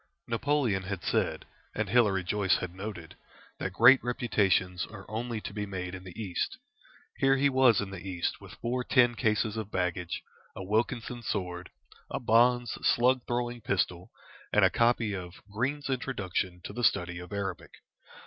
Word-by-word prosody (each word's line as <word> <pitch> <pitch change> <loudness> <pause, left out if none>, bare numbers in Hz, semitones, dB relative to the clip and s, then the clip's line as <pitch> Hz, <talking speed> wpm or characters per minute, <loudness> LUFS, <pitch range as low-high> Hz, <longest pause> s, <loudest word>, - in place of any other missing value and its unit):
Napoleon 120 -4 +1
had 95 -1 -5
said, - - 0 0.3
and - - -1
Hilary 105 -6 +3
Joyce 95 +1 +2
had 90 -1 -5
noted, 95 -4 -7 0.4
that 95 - -2
great 125 +6 +7
reputations 100 -7 +1
are 100 -2 -11
only 115 +1 -3
to - - -7
be 105 0 -3
made 90 -2 -5
in 95 -1 -7
the 90 +3 -10
East. 100 - -2 0.6
Here 135 0 +4
he 140 +1 +3
was 130 -4 +5
in 100 -2 -3
the 100 - -6
East 90 -3 -3
with - - -11
four 125 +2 -2
tin 120 -1 +4
cases 110 -1 0
of 110 -2 -4
baggage, 90 -2 -2 0.3
a 95 - -6
Wilkinson 115 +4 -1
sword, 90 -5 -3 0.4
a - - -3
Bond's 120 +1 +3
slug 125 +1 +3
throwing 120 0 -2
pistol, 90 -3 -1 0.4
and - - +5
a - - +4
copy 115 -2 +2
of 90 -2 -6 0.2
"Green's 135 +7 -1
Introduction 100 -9 -2
to - - -7
the 120 - -4
Study 90 -5 +2
of 90 0 -10
Arabic." 100 -3 -4
105 Hz, 165 wpm, -29 LUFS, 95-120 Hz, 0.6 s, great